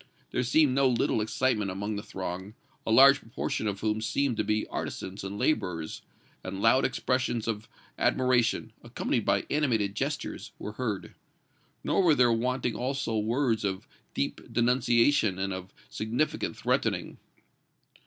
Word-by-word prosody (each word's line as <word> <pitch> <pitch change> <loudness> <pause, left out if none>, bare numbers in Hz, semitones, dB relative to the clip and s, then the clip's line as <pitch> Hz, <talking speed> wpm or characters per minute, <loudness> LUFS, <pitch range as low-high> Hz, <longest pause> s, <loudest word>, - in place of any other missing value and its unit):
There - - 0
seemed 130 +3 +3
no 135 0 +4
little 115 -2 +1
excitement 110 -1 0
among 100 +3 -3
the 100 - -3
throng, 95 0 -6 0.3
a - - +1
large 135 +4 +8
proportion 115 -2 -3
of 100 -1 -3
whom 110 0 0
appeared 120 +3 0
to - - +1
be 105 +1 0
artisans 95 +1 -5
and 100 +1 -5
laborers, 85 - -1 0.4
and 95 +1 -5
loud 115 +5 +4
expressions 125 -3 -1
of 110 -1 -3 0.3
admiration, 120 -3 +2
accompanied 120 -1 -2
by 100 0 +2
animated 115 -9 +1
gestures, - - -4
were 105 - -6
heard. 110 -4 -3 0.7
Nor - - +2
were 170 -5 +5
there 125 -3 +4
wanting 125 +1 0
also 130 -2 -2
words 115 +2 +1
of 95 -2 -2 0.3
deep 70 - -2
denunciation 120 -3 +3
and 95 0 -2
of 95 +1 -7 0.2
significant 115 +8 -2
threatening. - - -1
115 Hz, 145 wpm, -28 LUFS, 100-125 Hz, 0.7 s, large